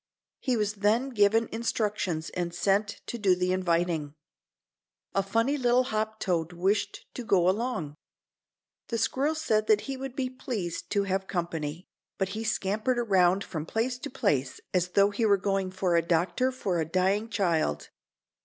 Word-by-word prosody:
He 255 -2 0
was 210 -1 0
then 225 +6 +3
given 225 -1 +3
instructions 210 -7 -1
and 175 -1 -3
sent 200 +3 +1
to 235 - -5
do 195 -3 +4
the 180 0 0
inviting. 170 -4 0 1.0
A 195 - +2
funny 230 +8 +1
little 245 0 +4
hop 220 -2 -2
toad 175 -2 -1
wished 200 +4 0
to 250 - -5
go 185 -5 +3
along. 195 - -1 0.9
The 230 - -2
squirrel 270 +7 +1
said 220 -9 +1
that 210 -1 +4
he 270 -1 -5
would 265 -1 -6
be 260 -1 -1
pleased 215 - -4
to 200 -1 +2
have 190 0 -1
company, 170 -2 -3 0.3
but 190 -1 0
he 215 +3 -4
scampered 220 +3 0
around 195 -4 +3
from 155 -2 -5
place 245 +5 -1
to - - -5
place 175 - 0
as 180 -1 +2
though 200 0 +5
he 205 +3 -2
were 205 -2 +5
going 195 -1 0
for 185 -2 0
a 170 - +5
doctor 175 +10 +1
for 195 -9 -2
a - - +2
dying 190 +6 +1
child. 175 -8 0
200 Hz, 165 wpm, -28 LUFS, 180-230 Hz, 1.0 s, though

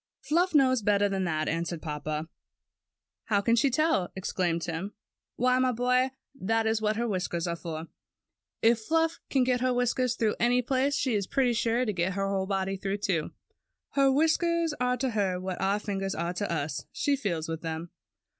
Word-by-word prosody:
"Fluff 345 +2 +1
knows 260 -4 +4
better 205 0 +3
than 195 -1 -1
that," 155 -2 -1
answered 170 +1 -2
papa 150 0 -4 1.0
"How 205 -2 +2
can 230 +3 +3
she 235 +4 +3
tell?" 265 - +1
exclaimed 175 -3 -1
Tim. 170 - -3
TIM'S 180 +5 -3
CAT - - -33 0.4
49 255 +1 +3
^Why, - - +3
my 255 0 +3
boy, 250 +2 +2 0.2
that 225 -3 0
is 220 0 +1
what 215 0 +1
her 235 +2 -1
whisk 185 -4 -2
ers 170 - -1
are 170 -1 -1
for. 165 -2 -6 0.8
If 230 0 +5
Fluff 325 +7 +1
can 265 -2 +3
get 250 -1 +1
her 255 0 +2
whiskers 245 0 +1
through 220 -3 0
any 245 +1 +3
place, 270 +3 +1
she 255 - 0
is 200 -3 0
pretty 255 -3 +2
sure 235 +2 +1
to 210 - -1
get 180 +1 0
her 195 0 -1
body 195 0 -1
through, 195 +1 -2
too. 185 -6 -1 0.6
Her 275 -1 +4
whiskers 325 +2 +2
are 250 0 +1
to 255 +1 -1
her 195 -4 0
what 185 0 -4
our 195 +1 +2
fingers 195 -2 -3
are 170 +1 -2
to 200 0 -3
us. 145 -3 -2
She 285 - +1
feels 175 - -2
with 165 0 -4
them." 165 +1 -5
210 Hz, 200 wpm, -28 LUFS, 180-250 Hz, 1.0 s, If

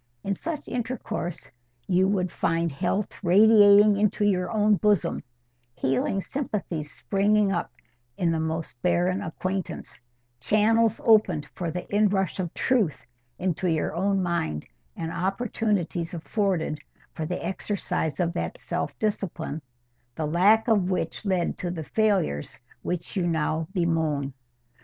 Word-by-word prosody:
In 195 - 0
such 315 - -5
intercourse 230 -8 -4 0.4
you 185 +1 +3
would 185 -3 0
find 165 0 0
health 195 +10 -2
radiating 205 +2 +7
into 210 0 +1
your 180 -3 +1
own 210 -2 +3
bosom; 210 -3 +1 0.5
healing 135 +9 0
sympathies 190 - -4
springing 205 0 +2
up 175 -9 -2 0.5
in 170 -2 +1
the 165 - 0
most 160 -6 -4
barren 180 +1 +1
acquaintance; 185 +3 -4 0.4
channels 220 - +3
opened 200 -9 +4
for 175 -2 -3
the 180 +2 -5
in 210 0 +4
rush 190 -2 -1
of 175 -3 -2
truth 225 - +1 0.3
into 180 0 -1
your 160 -2 0
own 195 +3 +1
mind; 80 - -1 0.3
and 165 - -4
opportunities 190 -2 -1
afforded 170 -3 -1 0.3
for 155 - -4
the 180 0 -4
exercise 190 -4 -2
of 170 -1 +1
that 340 - -3
self - - -4
discipline, 195 -7 -3 0.5
the 155 - -2
lack 195 +9 +4
of 205 -5 +3
which 180 -1 -2
led 185 -3 0
to 180 - -2
the 170 -2 -4
failures 195 - 0 0.2
which 175 - -4
you 180 -3 +1
now 160 -1 0
bemoan. 160 -6 0
185 Hz, 135 wpm, -26 LUFS, 165-205 Hz, 0.5 s, radiating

